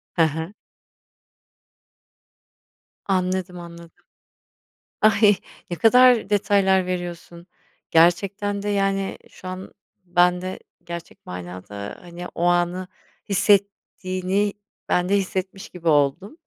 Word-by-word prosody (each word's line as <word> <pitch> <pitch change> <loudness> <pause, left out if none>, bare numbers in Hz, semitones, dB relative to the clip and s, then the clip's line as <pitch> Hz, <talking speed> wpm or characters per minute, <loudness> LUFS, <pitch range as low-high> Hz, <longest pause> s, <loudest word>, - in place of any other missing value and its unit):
Hı 170 - +2
hı. 160 +5 -2 2.5
Anladım 185 -1 -1
anladım. 170 -1 -13 1.0
Ay 210 -1 +5 0.3
ne 175 - -2
kadar 245 -1 +5
detaylar 195 -2 +3
veriyorsun. 175 -1 -6 0.4
Gerçekten 195 +5 +2
de 205 - -2
yani 195 -1 0
şu 185 - -12
an, 185 +1 -7 0.3
ben 180 0 +3
de, 185 0 -5 0.2
gerçek 170 0 -9
manada, 90 +3 -7
hani 175 0 -8
o 170 - -2
anı 175 +1 +1 0.4
hissettiğini 200 -1 +1 0.4
ben 180 0 +1
de 200 - +3
hissetmiş 190 0 -4
gibi 175 -2 -8
oldum. 150 - +2
185 Hz, 100 wpm, -23 LUFS, 170-200 Hz, 2.5 s, Ay